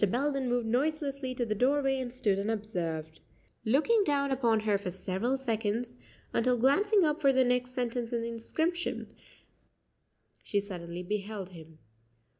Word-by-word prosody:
Belden 270 +3 0
moved 245 -1 +1
noiselessly 275 +1 -1
to 245 - 0
the 215 - 0
doorway, 270 +4 +2
and 250 -2 -4
stood 210 -6 +1
unobserved, 175 -7 -3 0.5
looking 315 - +4
down 280 -4 +1
upon 235 -5 +2
her 210 -2 +1
for 195 - -4
several 190 +7 -1
seconds, 230 -1 -2 0.4
until 245 +1 +2
glancing 390 - +4
up 305 0 +1
for 275 -2 +5
the 260 0 +4
next 250 0 +1
sentence 245 -2 -2
in 235 -1 -1
the 230 - -3
inscription, 320 +10 -2 1.3
she 205 - 0
suddenly 180 -3 -6
beheld 200 0 -4
him. 160 -3 -13
240 Hz, 145 wpm, -30 LUFS, 205-270 Hz, 1.3 s, for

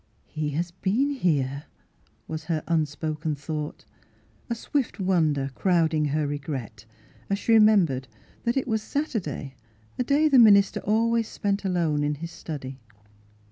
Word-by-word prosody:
" - - -38
He 155 -1 -3
has 170 +1 -2
been 210 +10 0
here," 145 - 0 0.6
was 155 -1 -5
her 160 -3 -1
unspoken 155 -1 -1
thought, 150 +1 -5 0.6
a 235 - 0
swift 255 0 -2
wonder 155 -8 +1
crowding 160 -2 +2
her 150 +1 0
re 145 0 -3
gret, 125 -7 -6 0.4
as 200 - +1
she 230 - +1
remembered 195 -12 +4 0.4
that 235 +2 0
it 265 - 0
was 220 -2 0
Satur 280 +1 -2
day, 140 -3 -6 0.5
a - - +3
day 290 +5 +3
the 275 -4 +6
minister 200 -3 +6
always 230 +1 +1
spent 200 0 -2
alone 165 -5 +1
in 145 0 0
his 165 +3 -7
study. 135 -6 -7
165 Hz, 150 wpm, -26 LUFS, 150-215 Hz, 0.6 s, the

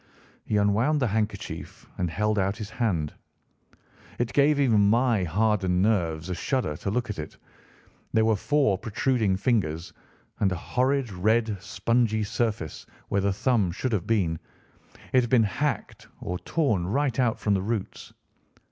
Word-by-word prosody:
He 105 - 0
unwound 110 +9 +2
the 130 - +2
handkerchief 110 +1 -4
and 90 -2 0
held 105 +5 0
out 95 +1 0
his 105 -1 -7
hand. 85 -11 -1 1.0
It 120 -1 -2
gave 145 +1 +4
even 110 -7 +4
my 115 -3 +3
hardened 95 0 +1
nerves 85 -7 0
a - - 0
shudder 90 - -1
to 100 - -4
look 120 +2 -1
at 100 - -6
it. 75 - -7 0.7
There 110 0 +3
were 110 -1 +3
four 135 -3 +1
protruding 115 -3 0
fingers 95 -8 0 0.5
and 95 - +2
a - - 0
horrid 130 +6 0
red, 110 +4 +1
spongy 110 0 0
surface 105 -7 -3 0.2
where 100 - +1
the 100 +1 +1
thumb 105 -2 +1
should 120 +8 -3
have 100 -6 -1
been. 90 -8 +1 0.7
It 130 - +6
had 120 - -3
been 120 -2 +5
hacked 115 +4 -2
or 90 0 -4
torn 105 - 0
right 135 +3 0
out 120 -3 +2
from 105 - +1
the 95 - +1
roots. 105 0 -4
105 Hz, 155 wpm, -26 LUFS, 95-120 Hz, 1.0 s, It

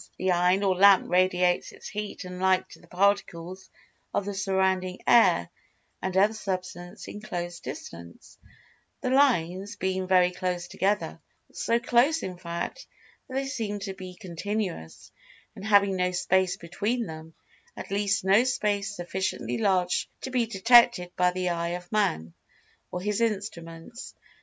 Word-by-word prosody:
The 185 0 0
iron 180 +3 +3
or 190 -2 +2
lamp 195 0 +5
radiates 180 -1 +2
its - - -11
heat 210 -2 -5
and 180 0 -7
light 190 0 +2
to - - -13
the - - -19
particles 190 -1 -1 0.5
of 200 - 0
the 205 - -3
surrounding 190 -1 0
air 235 -1 +4 0.5
and 190 0 -2
other 205 +3 +4
Substance 185 -2 -5
in 210 - -8
close 175 -4 -5
distance, 85 0 -10 0.6
the 255 - -1
"lines" 205 -7 +2
being 190 0 -2
very 180 -1 +4
close 180 -1 -3
together,—so 210 +4 -2
close 255 +7 +3
in 180 -2 -6
fact 170 - -5 0.4
that 260 - -8
they 270 0 0
seem 225 -7 -3
to 195 -1 -4
be 185 -1 -9
continuous 180 - -5 0.4
and - - -10
having 200 -2 +4
no 180 0 +1
space 185 +1 +1
between 210 +8 -2
them, 160 -2 -10 0.4
at - - -8
least 200 0 0
no 195 +5 +5
Space 210 -4 -1
sufficiently 190 +4 -3
large 185 -4 +1
to 260 - -5
be 245 -2 +1
detected 230 -3 +5
by 180 0 +3
the 180 0 -2
eye 170 0 -2
of 180 0 -15
Man, 85 - 0 0.6
or 180 - -5
his 210 +3 -1
instruments. 200 -1 -4
190 Hz, 145 wpm, -27 LUFS, 180-210 Hz, 0.6 s, lamp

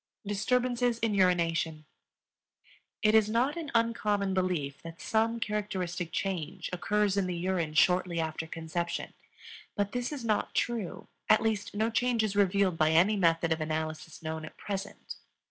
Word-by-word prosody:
Disturbances 245 +4 +1
in 225 -2 0
Urination. 170 -4 +1 1.2
It 215 0 +5
is 220 -1 +5
not 245 +6 +1
an 330 -4 -5
uncommon 210 -4 +1
belief 180 -7 -1
that 165 0 -10
some 225 +1 +1
characteristic 185 -5 -2
change 180 -1 -3
occurs 205 +2 +1
in 195 -2 +1
the 180 -1 -3
urine 170 -3 -1
shortly 180 +1 +3
after 160 0 -3
conception. 165 +1 -4 0.6
But 200 -1 0
this 245 +3 -2
is 275 -5 -5
not 215 -2 0
true; 230 -7 -2 0.2
at 215 - +7
least 215 -2 -1
no 220 +2 +1
change 240 -1 +2
is 210 -2 -1
revealed 195 -3 +2
by 155 0 +4
any 175 +7 +4
method 165 -3 +2
of 160 0 +1
analysis 155 +1 -4
known 160 0 -4
at 155 - -10
present. 200 0 -6
195 Hz, 150 wpm, -30 LUFS, 165-215 Hz, 1.2 s, at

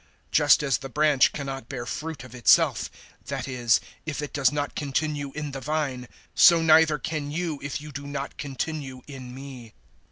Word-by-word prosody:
Just 145 0 +5
as 135 -3 +1
the 135 - -7
branch 145 -1 +4
cannot 135 -4 -6
bear 125 -3 -5
fruit 150 +2 -5
of 130 -2 -12
itself 120 -3 +3 0.4
that 135 -2 -4
is, 120 -4 +2 0.2
if 155 -3 -4
it 145 -1 -5
does 135 -3 +3
not 145 -1 -2
continue 145 0 -2
in 150 -1 -4
the 135 0 -6
vine 140 -4 -2 0.3
so 170 -2 +7
neither 160 -1 +5
can 150 +1 -4
you 160 -1 -3
if 140 +1 -4
you 150 0 -9
do 140 +1 -7
not 140 -1 -5
continue 135 -2 -5
in 130 -3 -9
me. 130 -4 -10
140 Hz, 180 wpm, -26 LUFS, 130-150 Hz, 0.4 s, so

